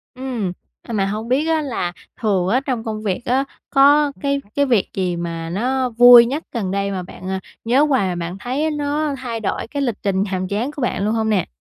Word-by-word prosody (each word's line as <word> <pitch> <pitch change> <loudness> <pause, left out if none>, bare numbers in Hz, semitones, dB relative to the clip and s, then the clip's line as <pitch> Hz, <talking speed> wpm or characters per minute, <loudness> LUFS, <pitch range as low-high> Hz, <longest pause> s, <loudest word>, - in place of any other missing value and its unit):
Ừm. 250 -7 -3 0.3
À, 235 - -8
mà 195 -2 +1
hông 215 +3 -3
biết 275 +5 +2
á 320 -1 +2
là 205 -11 -3 0.3
thường 195 -5 +1
á, 240 +6 +3
trong 245 -4 -2
công 215 -1 -4
việc 195 +1 -1
á, 260 +3 +2 0.3
có 285 +1 +5
cái 280 -1 0
cái 285 - +3
việc 235 -7 +2
gì 185 -2 -1
mà 165 -1 -4
nó 255 +7 0
vui 240 0 +9
nhất 280 +7 -3
gần 205 -7 -2
đây 200 0 -1
mà 185 -2 -3
bạn, 185 - -10
ờ, 190 - -1 0.3
nhớ 255 +5 +4
hoài 265 -10 +2
mà 180 - -2
bạn 180 +3 -7
thấy 255 +7 -2
á 315 - +1
nó 295 +1 -1
thay 240 -3 -4
đổi 220 +1 -3
cái 285 +3 -4
lịch 240 -5 0
trình 195 -1 +1
nhàm 185 -2 -3
chán 220 +8 -2
của 285 - -6
bạn 205 -4 -1
luôn 215 - +1
hông 220 -1 0
nè? 205 -3 +1
230 Hz, 240 wpm, -20 LUFS, 195-270 Hz, 0.3 s, vui